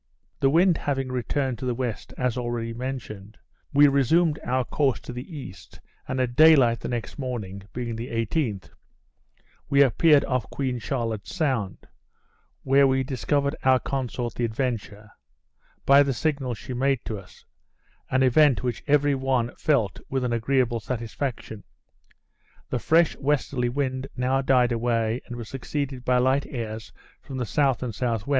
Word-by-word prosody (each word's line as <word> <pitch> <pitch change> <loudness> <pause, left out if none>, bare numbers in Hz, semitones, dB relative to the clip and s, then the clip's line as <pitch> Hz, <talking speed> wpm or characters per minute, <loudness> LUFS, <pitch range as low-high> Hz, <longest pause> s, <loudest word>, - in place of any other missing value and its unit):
The 135 - +3
wind 170 +3 +4
having 135 -2 -2
returned 130 0 -2
to - - -5
the 125 -1 -1
west, 120 -5 -4
as 125 -2 0
already 120 -2 -3
mentioned, 115 -5 -6 0.3
we 145 +1 +6
resumed 150 +4 +3
our 130 0 0
course 140 -4 0
to - - -8
the 130 +7 -7
east; 95 -10 -10 0.3
and 130 - -2
at 125 -1 -1
day 160 +2 +8
light 120 -4 +3
the - - -5
next 120 +4 -4
morning 110 -7 -4
(being 120 -2 -4
the 115 +2 -5
18th,) 115 - -2 1.0
we 140 0 +6
appeared 145 +3 +4
off 125 -5 -2
Queen 130 -3 -2
Charlotte's 115 - -3
Sound, 130 - -1 0.8
where 135 +1 +5
we 130 0 +1
discovered 140 +2 -1
our 130 0 +5
consort 125 -3 -3
the 120 - -3
Adventure, 110 -3 -3 0.7
by 140 +1 +7
the 140 -2 +1
signals 135 -4 -1
she 130 - -7
made 135 0 0
to 110 -3 -4
us; 95 - -17 0.6
an 130 0 +2
event 130 0 +4
which 125 -3 -3
every 145 0 +3
one 130 -3 0
felt 120 -11 +1
with 135 -1 -1
an 125 -1 0
agreeable 120 0 +1
satisfaction. 115 -1 -5 1.1
The 125 - 0
fresh 165 +5 +3
westerly 135 -3 0
wind 130 0 -2
now 130 +2 +1
died 125 -2 +3
away, 115 0 0
and 120 - -6
was 120 -2 -7
succeeded 135 0 -4
by 125 0 +2
light 130 +3 +2
airs 110 -4 -6 0.3
from 135 - -8
the 125 - -1
S. 115 - -8 0.3
and 120 -3 -3
S.W. 115 -2 -2
125 Hz, 160 wpm, -25 LUFS, 115-135 Hz, 1.1 s, day